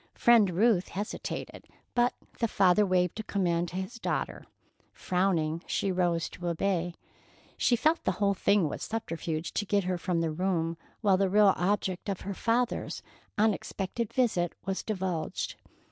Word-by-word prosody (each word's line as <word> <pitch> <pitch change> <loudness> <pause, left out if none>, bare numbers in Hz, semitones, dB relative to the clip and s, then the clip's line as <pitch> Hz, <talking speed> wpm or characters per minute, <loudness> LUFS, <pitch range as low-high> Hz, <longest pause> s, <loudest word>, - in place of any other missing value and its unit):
Friend 230 -5 +5
Ruth 190 +1 +3
hesitated, 205 +3 -5 0.3
but 245 0 +2 0.2
the 230 - +2
father 195 0 +4
waved 180 +1 +1
a - - -2
command 175 -4 0
to - - -9
his 190 +6 -4
daughter. - - -3 0.4
Frowning, 170 -4 0
she 195 - 0
arose 175 -2 +1
to 175 - -7
obey. 175 0 0 0.6
She 245 - +3
felt 310 +8 +2
the 190 - +1
whole 200 +1 +1
thing 200 -2 +2
was - - -5
a - - -2
subterfuge 165 -7 -3
to - - 0
get 205 0 +1
her 180 -1 -1
from 175 -1 0
the 165 -1 0
room 165 -1 0 0.3
while 200 -4 +4
the 195 0 +2
real 205 0 +6
object 190 +1 -1
of 195 - -3
her 200 - -4
father's 235 +4 -1 0.3
unexpected 210 +1 -1
visit 195 -9 +1
was 195 0 -1
divulged. 185 -6 -2
190 Hz, 160 wpm, -29 LUFS, 175-210 Hz, 0.6 s, real